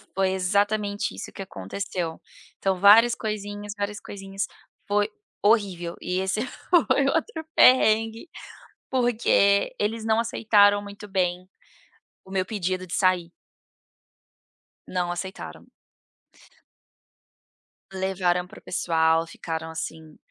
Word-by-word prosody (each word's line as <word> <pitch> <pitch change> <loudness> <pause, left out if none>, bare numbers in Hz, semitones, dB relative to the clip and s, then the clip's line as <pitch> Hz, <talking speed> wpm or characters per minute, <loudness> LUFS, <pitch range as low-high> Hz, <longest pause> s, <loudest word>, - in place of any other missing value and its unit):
Foi 190 -1 +2
exatamente 205 +2 0
isso - - -7
que 195 - -9
aconteceu. 170 - -5 0.4
Então, 190 -2 0
várias 225 +4 +7
coisinhas, 205 -1 -5
várias 205 0 -3
coisinhas, 195 0 -5 0.4
foi 205 +1 +1 0.3
horrível 195 -6 +1
e 180 +1 -1
esse 190 +3 -1
foi 295 0 +1
outro 320 +2 -1
perrengue, 225 +2 +4 0.6
porque 230 -5 +2
eles 220 +2 -1
não 220 0 +2
aceitaram 205 -3 +3
muito 205 0 -10
bem 185 -1 -1 0.8
o 190 - -16
meu 190 -1 0
pedido 185 -3 -3
de 170 - -6
sair. 180 -3 +2 1.6
Não 180 -1 -1
aceitaram. 185 +2 -7 2.3
Levaram 185 -2 0
para - - -13
o - - -28
pessoal. 165 -1 +1
Ficaram, 160 -1 -5
assim, 160 -1 -7
200 Hz, 105 wpm, -25 LUFS, 180-210 Hz, 2.3 s, várias